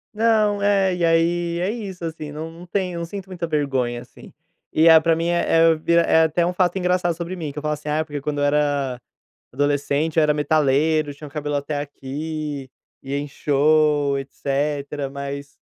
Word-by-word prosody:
Não, 215 -2 +2
é, 195 -2 +2
e 175 - -2
aí 170 +1 +2
é 185 +3 0
isso, 195 -7 -6
assim, 155 -2 -6
não 160 +2 -6
não 170 +2 -12
tenho 180 -2 -2
não 170 - -3
sinto 195 +2 -7
muita 180 -3 -5
vergonha, 135 -6 -1
assim. - - -15 0.4
E 160 +2 +4
é 160 -1 +9
pra 165 +1 +2
mim 165 +1 -1
é 165 -1 +4
vi 160 +2 -1
é 170 -1 +5
até 170 +2 +1
um 180 - -1
fato 180 0 +1
engraçado 180 -2 +1
sobre 170 +2 -5
mim, 155 -5 -5
que 140 - -16
eu 150 - -4
falo 150 0 0
assim: 150 0 -6
"Ah, 155 +1 0
porque 145 -2 -6
quando 150 0 -3
eu 145 - 0
era 145 -4 0 0.5
adolescente 145 +3 0
eu 160 - +5
era 150 0 +4
metaleiro, 150 0 +2
tinha 145 +1 -10
o - - -19
cabelo 145 -1 -3
até 145 +1 -3
aqui, 145 0 -5 0.3
ia 140 +1 -3
em 145 - -4
show, 145 0 +2
etcetera.", 140 +1 -3
mas 140 0 -7
155 Hz, 195 wpm, -22 LUFS, 145-170 Hz, 0.5 s, é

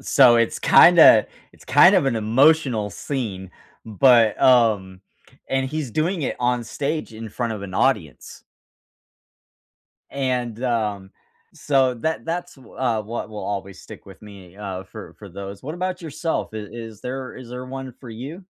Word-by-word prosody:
So 125 -4 +5
it's 115 -1 0
kinda - - +7 0.3
it's - - -20
kind 150 +9 +6
of 180 -7 +3
an 125 -4 0
emotional 120 -1 +2
scene. 100 -11 -5 0.4
But, 115 0 +4
um, 105 -7 +3 0.4
and 135 0 -1
he's 150 -2 -4
doing 160 - -1
it - - -3
on 125 -1 0
stage 140 +4 -4
in 110 0 -8
front 115 +2 -3
of 105 - -6
an 95 -2 -8
audience. 95 - -2 1.7
And, 125 -4 -3
um, 105 -6 -2 0.5
so 135 -3 +1
that 160 +7 -3
that's 175 +1 -5
wh 130 -3 -18
uh, 120 -4 0
what 115 +3 -6
will 105 - -8
always 100 -1 -5
stick - - -13
with 95 -1 -14
me, 100 -3 -14
uh, 95 -3 -6
for 95 - -11
for - - -10
those. 100 0 -9
What 155 +4 -6
about 185 0 -4
yourself? 160 -2 -4
Is 105 -1 -7 0.3
is - - -23
there 130 0 -6
is 130 -2 -11
there 125 +1 -7
one 130 0 -7
for 125 - -11
you? 140 - -9
120 Hz, 160 wpm, -22 LUFS, 105-135 Hz, 1.7 s, kinda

